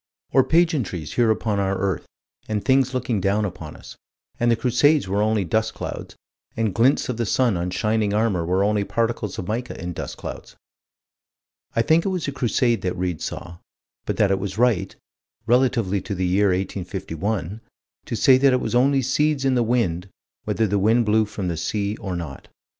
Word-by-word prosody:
Or 135 +1 +5
pageantries 150 - 0
here 120 -2 +3
upon 110 -2 0
our 95 0 0
earth, 95 -2 -2 0.4
and 105 -2 -2
things 130 -1 +3
looking 120 -5 -1
down 100 +3 +1
upon 85 -5 -7
us - - -12 0.4
and 120 - +2
the 115 - +4
Crusades 130 +2 +2
were 100 +2 0
only 105 -2 +1
dust 110 +6 0
clouds, - - -6 0.4
and 110 -4 0
glints 125 +7 +3
of 125 - -3
the 120 - -1
sun 125 -4 +2
on 85 +1 -2
shining 105 +3 0
armor 105 -4 +1
were 90 +3 +1
only 105 0 +1
particles 115 -2 -2
of 90 - -5
mica 120 +3 -4
in 90 +1 -5
dust - - -6
clouds. - - -8 1.2
I 115 - +3
think 160 +6 +3
it - - -1
was 180 -5 -2
a - - -1
Crusade 120 -4 +1
that 90 0 -2
Read 90 -3 -2
saw 85 -1 -6 0.5
but - - -2
that 100 -2 +3
it 95 - +1
was 95 0 -5
right, 120 -5 +1 0.5
relatively 115 -5 +2
to 100 - -5
the 95 0 -1
year 95 +3 +3
1851, 95 +1 -3 0.5
to - - -2
say 130 -1 +5
that 135 -1 +4
it 125 - +3
was - - -3
only 135 +2 +3
seeds 140 +2 +1
in 135 - +3
the 125 - +2
wind, 110 -7 0 0.4
whether 115 - +1
the 100 0 0
wind 110 +4 +3
blew 110 +1 +3
from 100 -2 -5
the 85 - -1
sea 100 +4 -2
or 95 -3 -5
not. 80 -6 -7
105 Hz, 190 wpm, -23 LUFS, 95-120 Hz, 1.2 s, Or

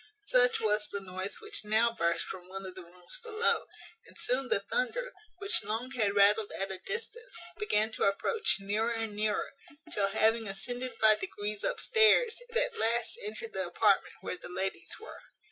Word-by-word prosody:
Such 250 -8 +4
was 210 -1 +2
the 200 - -4
noise 190 0 -3
which 430 - -7
now 220 +3 +3
burst 170 -5 0
from 180 -2 -8
one 195 +1 -7
of 185 - -7
the 185 - -9
rooms 180 - -9
below; 460 0 +1 0.4
and - - -16
soon 255 +2 0
the - - +3
thunder, - - -2 0.2
which 400 +1 +3
long 230 +4 -3
had 215 -6 0
rattled 205 +1 +4
at 195 0 -2
a 190 - -2
distance, 470 +1 -5 0.2
began 220 - +1
to - - -1
approach 415 - +1
nearer 210 +4 -1
and 225 -2 -3
nearer, 210 0 -1 0.4
till, 200 -1 +2
having 220 +2 +2
ascended 245 +5 -3
by 220 -1 +7
degrees 210 - -4
upstairs, 455 +1 +3
it 470 - -2
at - - 0
last 235 - +2
entered 455 +1 -6
the - - -2
apartment - - +2
where - - -4
the - - -7
ladies 190 - -3
were. 445 - -11
225 Hz, 180 wpm, -30 LUFS, -, 0.4 s, by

